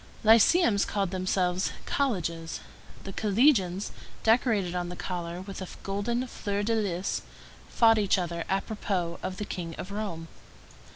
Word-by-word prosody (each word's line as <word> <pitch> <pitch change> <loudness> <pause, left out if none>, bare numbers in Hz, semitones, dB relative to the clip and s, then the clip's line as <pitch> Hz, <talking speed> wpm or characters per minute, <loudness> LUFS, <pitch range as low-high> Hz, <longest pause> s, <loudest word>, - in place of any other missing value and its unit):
Lyceums 225 - +6
called 195 -3 -1
themselves 185 -1 0
colleges. 170 - -1 0.4
The 195 - -7
collegians, 205 -4 +3 0.3
decorated 220 -6 +3
on 175 -1 -2
the 180 - -6
collar 175 -1 -4
with 195 0 -7
a 190 - -4 0.2
golden 220 +6 -1
fleur 205 -4 -3
de 230 +2 +1
lys, 195 -4 -1 0.5
fought 225 -1 +5
each 200 -1 +3
other 170 -2 -2
apropos 195 -3 -1
of 185 - -4
the 210 - -3
King 165 -4 -5
of 185 - -6
Rome. 200 -6 -4
195 Hz, 135 wpm, -28 LUFS, 180-215 Hz, 0.5 s, Lyceums